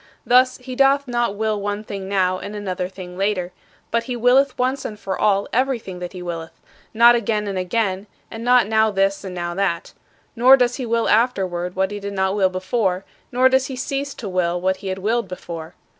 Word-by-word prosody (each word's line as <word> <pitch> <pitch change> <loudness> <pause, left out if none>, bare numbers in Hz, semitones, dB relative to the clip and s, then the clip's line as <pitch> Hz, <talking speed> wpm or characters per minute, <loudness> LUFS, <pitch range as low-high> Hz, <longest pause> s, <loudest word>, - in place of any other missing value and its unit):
Thus, 255 +1 +4
he 255 0 -8
doth 275 +1 +3
not 240 -4 0
will 215 -1 -1
one 205 +1 -3
thing 195 -2 -6
now 185 -2 +1
and 205 +1 -7
another 185 -3 -3
thing 185 -1 -10
later, 195 -3 0 0.4
but 230 0 0
he 250 - -3
willeth 250 +3 +3
once 255 +2 0
and 210 -1 -6
for 190 -2 -3
all 200 -1 +2
everything 240 -7 -1
that 180 +1 -6
he 180 -1 -7
willeth 165 -2 -6 0.3
not 235 +2 +7
again 220 -2 0
and 200 -1 -3
again; 190 +1 -1 0.2
and 225 0 -7
not 245 -1 +5
now 220 +1 +3
this 195 -1 0
and 185 -2 -6
now 175 -1 -3
that. 175 -2 -2 0.4
Nor 255 +3 +7
does 245 -1 +1
he 255 -3 -4
will 230 0 +1
afterward 185 -6 +1
what 190 +1 0
he 205 - -5
did 200 0 -5
not 190 0 0
will 190 -2 +3
before, 185 0 -1 0.3
nor 255 +1 +4
does 265 +1 +2
he 265 - -6
cease 275 +2 -3
to 220 - -7
will 180 -2 0
what 190 +1 0
he 195 - -8
had 190 0 -2
willed 220 +3 0
before. 170 -2 -8
205 Hz, 210 wpm, -21 LUFS, 185-240 Hz, 0.4 s, not